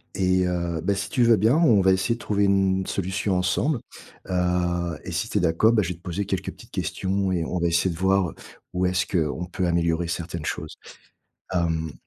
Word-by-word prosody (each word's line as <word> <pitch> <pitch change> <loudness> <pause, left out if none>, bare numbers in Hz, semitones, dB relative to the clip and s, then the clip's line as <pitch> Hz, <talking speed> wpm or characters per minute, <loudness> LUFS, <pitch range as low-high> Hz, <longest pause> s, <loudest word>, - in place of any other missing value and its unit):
et 95 -1 +2
heu, 85 -2 -2
bah, 100 - +1
si 95 0 -3
tu 125 - +2
veux 115 -2 +5
bien, 110 +8 +3
on 130 -12 +5
va 95 0 +4
essayer 95 +5 +1
de - - -13
trouver 100 -1 0
une 95 -1 +2
solution 95 0 -1
ensemble. 115 - +1 0.5
Heu 90 -2 0
et 90 - -5
si 95 +6 -2
tu - - -1
es - - +2
d'accord, 85 +7 +3
bah, 110 -2 +3
je 85 - -3
vais 90 - -3
te 85 - -21
poser 95 +2 -3
quelques 95 -2 -3
petites - - -16
questions 95 0 -1
et 85 -3 0
on 90 - -3
va 85 - +1
essayer 85 +1 +1
de - - -9
voir 95 -2 +2 0.4
où 90 +1 0
est-ce 90 +1 +1
qu'on 85 0 -1
peut 90 0 -3
améliorer 85 0 +1
certaines 85 -1 -4
choses. 80 0 -4 0.8
Hem, 80 -3 0
90 Hz, 215 wpm, -24 LUFS, 85-100 Hz, 0.8 s, veux